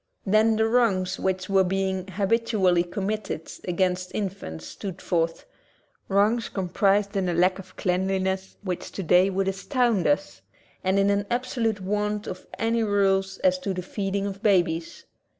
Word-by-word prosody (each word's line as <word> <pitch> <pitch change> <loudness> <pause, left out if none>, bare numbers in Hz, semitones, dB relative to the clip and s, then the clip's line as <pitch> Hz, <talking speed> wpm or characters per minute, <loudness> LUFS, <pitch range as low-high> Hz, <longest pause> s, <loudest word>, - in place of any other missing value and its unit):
Then 215 +2 +4
the 220 0 +2
wrongs 195 -6 +2
which 185 -1 -1
were 195 -1 +4
being 190 0 -1
habit 205 +4 0
ually 180 -5 +2
committed 205 -5 -3 0.2
against 180 0 0
infants 185 - -4
stood 190 - -7
forth, 165 -2 -1 0.6
wrongs 210 +4 +2
comprised 200 +2 +1
in 190 -2 0
a 175 - -1
lack 185 +2 +3
of 190 - -12
cleanliness 190 +1 -1
which 180 -3 -4
today 180 0 +3
would 195 0 -1
astound 220 - +1
us 95 -10 0 0.4
and 190 +1 +2
in 200 0 +3
an 200 0 0
ab 240 +1 0
solute 225 -5 -1
want 210 +2 -1
of 185 - -7
any 230 +1 +1
rules 195 -2 +1
as 275 -1 +3
to 200 -8 -3
the 180 - -4
feeding 195 +1 -2
of 200 0 -5
babies. 175 -6 +1
195 Hz, 155 wpm, -25 LUFS, 185-210 Hz, 0.6 s, Then